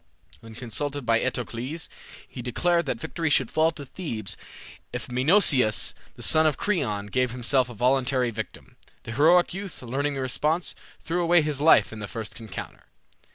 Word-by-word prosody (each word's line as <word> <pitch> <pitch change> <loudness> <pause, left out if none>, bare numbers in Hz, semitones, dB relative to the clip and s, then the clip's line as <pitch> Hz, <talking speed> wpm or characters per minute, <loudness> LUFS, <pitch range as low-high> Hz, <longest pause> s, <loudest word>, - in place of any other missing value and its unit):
When 115 -1 -13
consulted 140 +4 -3
by 115 0 +3
Eteocles, 125 +5 -3 0.4
he 125 - -8
declared 170 +7 +1
that 120 - -2
victory 165 +6 -2
should 130 -4 +2
fall 160 +1 +3
to 145 -2 -9
Thebes 120 - -5 0.6
if - - -5
Menoeceus, 130 - +3 0.2
the - - -6
son 155 0 +4
of 150 - 0
Creon, 120 - -1
gave 125 +4 0
himself 125 +1 +1
a 120 - -9
voluntary 125 +1 +2
victim. 110 -1 -8 0.3
The - - -7
heroic 165 +9 +4
youth, 195 -6 -7
learning 140 +4 -1
the 135 - -3
response, 150 +6 0 0.3
threw 175 +2 -1
away 170 -1 +4
his 150 -2 -1
life 155 -6 +5
in 110 - -8
the 105 - -5
first 110 +1 -6
encounter. 110 -5 -8
130 Hz, 165 wpm, -26 LUFS, 115-160 Hz, 0.6 s, life